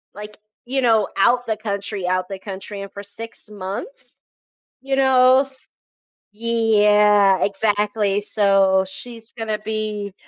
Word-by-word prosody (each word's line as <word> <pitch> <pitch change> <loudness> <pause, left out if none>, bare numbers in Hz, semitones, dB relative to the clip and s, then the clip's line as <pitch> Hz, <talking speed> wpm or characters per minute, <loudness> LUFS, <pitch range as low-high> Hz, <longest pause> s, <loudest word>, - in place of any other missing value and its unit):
like, 210 0 -10 0.3
you 265 +2 -1
know, 225 -4 +3
out 245 +5 +3
the 220 - -1
country, 200 -3 -4
out 185 0 0
the 195 -1 -7
country 195 +1 -8
and 200 - -8
for 200 - -9
6 225 +4 -10
months, 210 - -8 0.7
you 270 0 -1
know? 260 0 +5 0.9
Yeah, 210 -3 +3
exactly, 205 0 0
so 195 -2 +2
she's 230 +2 -10
gonna 220 -2 -3
be 210 -2 -4
210 Hz, 125 wpm, -21 LUFS, 200-230 Hz, 0.9 s, know